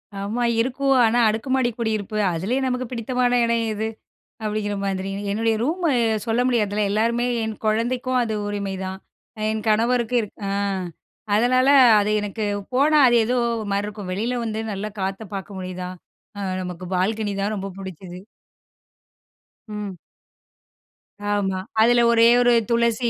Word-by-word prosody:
ஆமா, 205 +5 -2 0.2
இருக்கூ. 265 +3 -3 0.2
ஆனா, 230 +2 +2
அடுக்குமாடி 250 +3 0
குடியிருப்பு. 215 -2 -2 0.2
அதுலயும் 230 +11 -1
நமக்கு 250 0 -1
பிடித்தமான 245 +1 0
இடம் 230 0 +1
எது? 215 +1 -2 0.6
அப்டிங்கிற 210 -1 -2
மாதிரி. 195 0 -2 0.2
என்னுடைய 225 +2 +1
ரூமு 335 +3 0 0.4
சொல்ல 230 +1 +1
முடியாதுல. 210 -4 +1
எல்லாருமே, 230 +3 +1 0.2
என் 220 -1 -3
கொழந்தைக்கும் 245 +4 0
அது 225 -2 -3
உரிமைதான். 190 -2 -4 0.5
என் 220 -1 -2
கணவருக்கு 235 +2 +2
இருக் 210 - -9
ஆ, - - -2 0.9
அதனால 255 +4 +3 0.3
அது 205 +1 0
எனக்கு 210 +1 -4 0.3
போனா, 295 +4 +4
அது 240 - +4
ஏதோ 250 +2 0 0.2
ஒரு 215 - -5
மாரி 200 +1 0
இருக்கும். 205 -3 -7
வெளில 235 +6 -1
வந்து 220 0 -3
நல்ல 200 +1 -4 0.2
காத்த 195 +3 -3
பாக்க 195 +1 -6
முடியுதா? 185 0 -5 0.5
அ - - -4 0.2
நமக்கு 180 0 -7
பால்கனி 205 +3 0
தான் 205 +2 -1
ரொம்ப 195 -1 -4
புடிச்சுது. 185 -1 -8 1.5
ம். 210 -3 -6 1.3
ஆமா. 200 -2 0 0.2
அதுல 240 +1 +5
ஒரே 230 0 +6
ஒரு 245 0 +4 0.2
துளசி 235 0 +2
220 Hz, 135 wpm, -22 LUFS, 200-240 Hz, 1.5 s, ஒரே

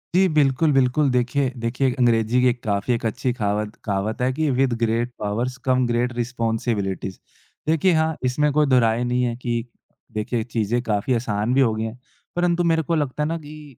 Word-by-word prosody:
जी, 190 +1 +5
बिल्कुल, 150 +1 +3
बिल्कुल। 135 +2 +3
देखिए 125 +2 +1
देखिए, 125 +3 +1
अंग्रेज़ी 115 0 +3
की 125 - +4
एक 120 0 -3
काफ़ी 100 +3 0
एक 115 - -2
अच्छी 125 +3 -1
कहावत 105 -2 -2
कहावत 105 +3 -2
है 125 +1 +2
कि 155 +2 0
"with 130 -1 +2
great 115 +2 0
powers 115 +5 -2
come 130 -1 +3
great 120 +1 0
responsibilities." 115 -5 -2 0.5
देखिए 165 +3 +3
हाँ, 160 0 +1
इसमें 150 +4 +2
कोई 150 +1 +4
दो 130 -2 +5
राय 115 0 +2
नहीं 125 +1 0
है 120 -1 -1
कि 120 -1 -3 0.5
देखिए, 110 +2 -2
चीज़ें 115 0 -1
काफ़ी 110 +2 0
आसान 110 -1 -1
भी 135 - +4
हो 115 -4 +3
गई 110 - -2
हैं। 110 +2 -6 0.4
परंतु 175 0 +1
मेरे 165 -1 +2
को 165 +3 0
लगता 150 -1 -1
है - - 0
ना 165 - -1
कि, 150 -3 -12
125 Hz, 195 wpm, -22 LUFS, 115-135 Hz, 0.5 s, जी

